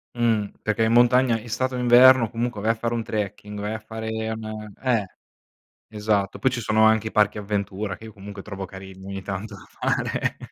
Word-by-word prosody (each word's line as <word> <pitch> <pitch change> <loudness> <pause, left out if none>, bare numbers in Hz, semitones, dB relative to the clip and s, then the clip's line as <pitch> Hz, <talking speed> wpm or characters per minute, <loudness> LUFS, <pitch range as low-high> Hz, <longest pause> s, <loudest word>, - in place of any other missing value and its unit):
Mhm, 115 -4 +1
perché 110 +1 0
in 110 - +2
montagna, 120 0 +5
estate 125 +3 -2
o - - -3
inverno, 125 -1 +7
comunque 120 -2 -3
vai 110 +2 +1
a - - +4
fare 115 +1 -2
un 115 -1 -2
trekking, 105 -1 -4
vai 105 +2 -3
a - - -3
fare 110 0 -7 0.2
un 110 -1 -6
eh, 120 -6 +1 0.8
esatto, 105 -2 -1
poi 130 - +3
ci 120 -1 -3
sono 110 +1 +3
anche 110 0 +3
i - - -5
parchi 105 0 +2
avventura 100 -1 -3
che 110 - -12
io 110 - -10
comunque 100 0 -9
trovo 95 -2 -6
carini 95 0 -10
ogni 100 0 -5
tanto 100 +2 -5
fare, - - -1
110 Hz, 195 wpm, -24 LUFS, 100-115 Hz, 0.8 s, inverno